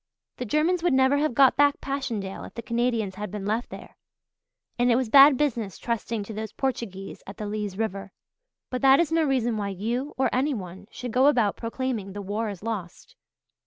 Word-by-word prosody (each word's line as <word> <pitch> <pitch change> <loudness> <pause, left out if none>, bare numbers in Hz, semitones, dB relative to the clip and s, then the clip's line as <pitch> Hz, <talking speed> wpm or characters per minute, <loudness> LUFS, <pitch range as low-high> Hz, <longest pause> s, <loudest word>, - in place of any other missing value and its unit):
The 250 - -4
Germans 315 - +1
would 345 -6 +2
never 265 +2 +4
have 290 -4 0
got 270 -1 +6
back 285 0 +3
Passchendaele 230 -9 -4
if - - -13
the 235 - -6
Canadians 235 -4 0
had 210 - -3
been 205 -1 -6
left 220 +4 -1
there; - - -11 0.8
and 245 0 +4
it - - +4
was 250 -2 0
bad 275 +2 +8
business 235 - -1
trusting 230 -2 -3
to 220 - -8
those 215 0 -6
Portuguese 230 -8 -4
at 195 - -9
the 210 - -5
Lys 205 -2 -4
River. 200 -3 -3 0.6
But 255 - -2
that 270 0 +6
is 340 -2 +1
no 325 0 +3
reason 245 -6 +1
why 200 -1 -2
you 235 +9 -3
or 265 - +2
anyone 200 - -2
should 250 -2 -7
go 255 +4 +4
about 235 -8 +3
proclaiming 230 -4 -4
the 205 - -5
war 210 +3 -2
is 200 -2 -8
lost. 205 -7 -6
235 Hz, 200 wpm, -26 LUFS, 205-265 Hz, 0.8 s, bad